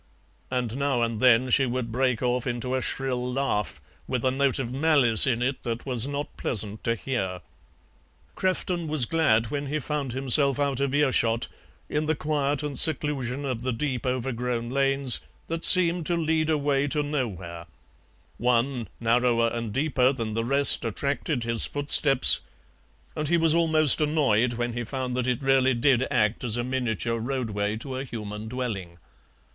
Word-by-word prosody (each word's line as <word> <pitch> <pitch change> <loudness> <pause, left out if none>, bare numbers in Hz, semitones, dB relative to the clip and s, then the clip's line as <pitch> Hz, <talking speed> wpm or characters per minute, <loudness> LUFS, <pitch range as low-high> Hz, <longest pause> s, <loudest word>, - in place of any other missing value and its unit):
And 125 -2 -3
now 140 -4 0
and 115 -2 -3
then 125 +1 +3
she 135 +2 +3
would 120 -1 -4
break 125 0 -1
off 125 0 -1
into 125 +1 -4
a 130 - -1
shrill 125 -2 -2
laugh, 125 - -2 0.3
with 125 -1 -3
a 130 - +2
note 135 -1 0
of 125 -2 -4
malice 135 -6 +5
in 120 -2 0
it 130 +2 -2
that 115 0 -5
was 125 -2 +2
not 145 +1 -5
pleasant 105 -2 -1
to 115 - 0
hear. 95 -8 -4 0.9
Crefton 180 -2 -2
was 150 -5 +1
glad 115 -8 +1
when 145 -1 -4
he 150 +3 -2
found 145 -3 -4
himself 135 +2 +3
out 140 -2 -1
of 140 0 -1
earshot, 120 -5 +1 0.4
in 150 +1 -2
the 160 - 0
quiet 145 -1 -2
and 145 -3 -2
seclusion 140 -3 +1
of 125 -4 -4
the 130 +1 -2
deep 130 0 -3
overgrown 125 -1 -3
lanes 135 -1 +1 0.2
that 165 0 -5
seemed 175 -2 +6
to 175 - 0
lead 160 -1 -1
away 145 -2 0
to 150 +1 0
nowhere; 95 - -5 0.7
one, 120 0 0
narrower 115 0 +1
and 115 -2 -5
deeper 135 0 +1
than 115 -5 -5
the 115 +1 -2
rest, 140 +4 +4
attracted 140 -2 -3
his 115 -1 +1
footsteps, 145 -2 +5 0.8
and 150 - -3
he 170 +3 +2
was 165 -1 +2
almost 160 -3 +3
annoyed 130 -6 +1
when 120 0 -3
he 120 +1 -4
found 125 +2 -5
that 125 0 -2
it 125 +2 -2
really 135 -1 +2
did 130 +1 +1
act 115 -3 0
as 120 -1 -2
a 120 - -2
miniature 120 -2 -2
roadway 110 -4 -3
to 130 +3 -7
a 130 - -4
human 110 -4 -7
dwelling. 110 -8 -5
130 Hz, 170 wpm, -25 LUFS, 115-140 Hz, 0.9 s, seemed